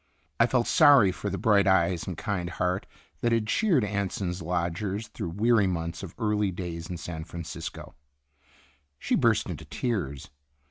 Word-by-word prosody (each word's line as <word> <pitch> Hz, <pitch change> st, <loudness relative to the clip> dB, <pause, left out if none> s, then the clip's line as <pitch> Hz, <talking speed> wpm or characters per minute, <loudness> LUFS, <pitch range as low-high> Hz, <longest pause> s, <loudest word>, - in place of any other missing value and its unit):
I 115 Hz, -, +6 dB
felt 120 Hz, -1 st, +1 dB
sorry 140 Hz, -, +6 dB
for 100 Hz, +3 st, -4 dB
the 95 Hz, -, -3 dB
bright 100 Hz, +1 st, +3 dB
eyes 90 Hz, -2 st, +2 dB
and 90 Hz, -4 st, -4 dB
kind 90 Hz, -2 st, -2 dB
heart 90 Hz, +2 st, -2 dB, 0.3 s
that 120 Hz, -, +1 dB
had 115 Hz, -2 st, +2 dB
cheered 165 Hz, -, +2 dB
Anson's 100 Hz, -3 st, -2 dB
lodgers 90 Hz, +5 st, -2 dB
through 85 Hz, -, -5 dB
weary 105 Hz, +3 st, +3 dB
months 85 Hz, -2 st, -3 dB
of 95 Hz, -4 st, -8 dB
early 105 Hz, -3 st, +1 dB
days 85 Hz, -2 st, -6 dB
in 90 Hz, -, -4 dB
San 80 Hz, -1 st, -6 dB
Francisco. 80 Hz, -1 st, -7 dB, 1.0 s
She -, -, -3 dB
burst -, -, +3 dB
into -, -, -6 dB
tears. 75 Hz, -, -3 dB
95 Hz, 155 wpm, -27 LUFS, 85-105 Hz, 1.0 s, I